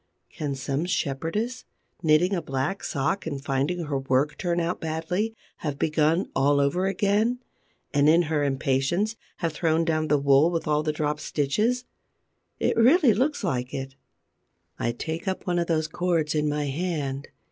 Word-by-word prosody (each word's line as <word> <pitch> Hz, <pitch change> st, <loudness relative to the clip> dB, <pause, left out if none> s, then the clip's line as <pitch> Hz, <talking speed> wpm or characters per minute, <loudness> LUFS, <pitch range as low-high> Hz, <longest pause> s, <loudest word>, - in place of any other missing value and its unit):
Can 145 Hz, -3 st, -3 dB
some 135 Hz, +4 st, -2 dB
shepherdess, 180 Hz, -, -2 dB, 0.4 s
knitting 165 Hz, +3 st, +3 dB
a 180 Hz, -, 0 dB
black 135 Hz, +9 st, -2 dB
sock 150 Hz, +6 st, -1 dB
and 145 Hz, -3 st, -3 dB
finding 140 Hz, +6 st, -1 dB
her 145 Hz, -3 st, -2 dB
work 135 Hz, +2 st, +1 dB
turn 175 Hz, -1 st, -1 dB
out 170 Hz, +1 st, -2 dB
badly, 165 Hz, +8 st, -2 dB, 0.2 s
have 145 Hz, -3 st, -4 dB
begun 155 Hz, +4 st, +2 dB
all 140 Hz, +1 st, +3 dB
over 160 Hz, +7 st, +1 dB
again 205 Hz, +5 st, +1 dB, 0.6 s
and, 145 Hz, +1 st, +4 dB
in 170 Hz, +2 st, +5 dB
her 155 Hz, -2 st, 0 dB
impatience, 140 Hz, +9 st, 0 dB, 0.2 s
have 165 Hz, -3 st, -2 dB
thrown 165 Hz, +1 st, +1 dB
down 155 Hz, -1 st, 0 dB
the 150 Hz, -, +3 dB
wool 140 Hz, +3 st, +4 dB
with 165 Hz, -1 st, -2 dB
all 150 Hz, 0 st, +2 dB
the 155 Hz, 0 st, 0 dB
dropped 150 Hz, 0 st, -2 dB
stitches? 215 Hz, -, 0 dB, 0.7 s
It -, -, +1 dB
really 255 Hz, -, +6 dB
looks 265 Hz, +5 st, 0 dB
like 125 Hz, -8 st, -2 dB
it. 135 Hz, 0 st, -5 dB, 0.9 s
I 120 Hz, -, 0 dB
take 160 Hz, -, -5 dB
up 190 Hz, -, -2 dB
one 175 Hz, -1 st, +1 dB
of 170 Hz, -, -1 dB
those 160 Hz, -2 st, +1 dB
cords 165 Hz, -3 st, 0 dB
in 150 Hz, -1 st, +1 dB
my 150 Hz, 0 st, -1 dB
hand. 145 Hz, -2 st, -2 dB
155 Hz, 165 wpm, -26 LUFS, 140-180 Hz, 0.9 s, really